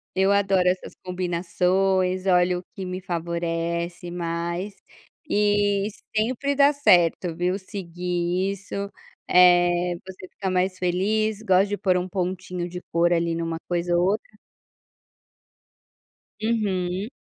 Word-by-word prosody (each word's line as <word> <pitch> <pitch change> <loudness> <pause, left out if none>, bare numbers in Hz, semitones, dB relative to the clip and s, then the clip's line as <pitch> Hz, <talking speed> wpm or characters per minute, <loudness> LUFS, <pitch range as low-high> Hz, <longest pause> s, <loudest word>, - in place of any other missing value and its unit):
Eu 190 +1 +3
adoro 195 -2 +3
essas 180 0 -1
combinações. 185 +1 0
Olho 180 -1 +3
o - - -12
que 190 -2 -5
me 180 +1 -5
favorece 170 0 -3
mais 170 +3 -3 0.6
e 205 -1 +2 0.3
sempre 255 +6 0
dá 285 +1 +6
certo, 175 - +3
viu, 180 +3 -1
seguir 180 0 -2
isso, 200 +1 -12 0.6
eh, 175 -1 +5
você 185 0 -9
fica 190 -2 -4
mais 185 0 0
feliz. 210 +4 0
Gosta 190 -2 +4
de 205 0 -2
pôr 185 -2 +2
um 180 +1 -2
pontinho 180 -1 -3
de 180 +1 -7
cor, 170 +1 +3
ali, 170 0 +1
em 165 - -2
uma 165 -1 -3
coisa 175 0 -1
ou 175 - +3
outra. 210 0 -5 2.0
Uhum. 200 -3 -1
180 Hz, 125 wpm, -24 LUFS, 175-195 Hz, 2.0 s, dá